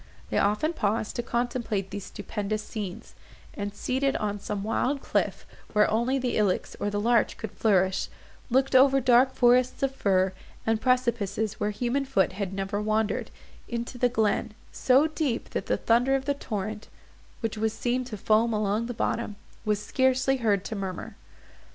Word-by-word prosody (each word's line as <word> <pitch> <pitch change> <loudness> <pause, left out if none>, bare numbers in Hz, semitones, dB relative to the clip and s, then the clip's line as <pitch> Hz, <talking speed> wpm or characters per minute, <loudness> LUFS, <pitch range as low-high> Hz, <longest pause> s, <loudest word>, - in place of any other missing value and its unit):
They - - +2
often 210 +11 +1
paused 215 -5 -1
to - - +1
contemplate 235 -5 -2
these 205 -2 -5
stupendous 210 0 -4
scenes, 210 0 -6 0.4
and, 205 0 -4
seated 270 +4 0
on 205 -1 -2
some 200 0 -4
wild 255 +6 0
cliff, - - -1 0.3
where 210 -1 +5
only 235 +5 +1
the 255 -2 -1
ilex 205 -4 0
or 205 - 0
the 205 0 -2
larch 235 +2 +2
could 220 -3 -6
flourish, 190 -3 +2 0.4
looked 265 +2 +2
over 270 +1 +6
dark 255 +1 +4
forests 250 +2 +3
of 270 0 +1
fir, 190 -6 +2 0.3
and 225 0 +1
precipices 230 -5 0
where 210 - 0
human 245 +6 -1
foot 225 -10 +2
had 195 -1 -4
never 195 +1 -2
wandered, 215 0 0 0.4
into 235 +1 -5
the 245 - +3
glen—so 230 +4 +1
deep, 305 -6 -2
that - - -3
the - - +1
thunder 245 +4 +3
of 270 0 -2
the 285 - +1
torrent, 215 -5 -5 0.5
which 225 -2 -2
was 220 0 0
seen 245 +3 -1
to 225 -4 -6
foam 220 +3 +2
along 210 +2 0
the 245 - -5
bottom, 225 -2 -1 0.3
was 210 -1 +1
scarcely 260 +3 +2
heard 205 -5 +1
to 220 - -4
murmur. 190 -3 -5
225 Hz, 165 wpm, -27 LUFS, 205-255 Hz, 0.5 s, over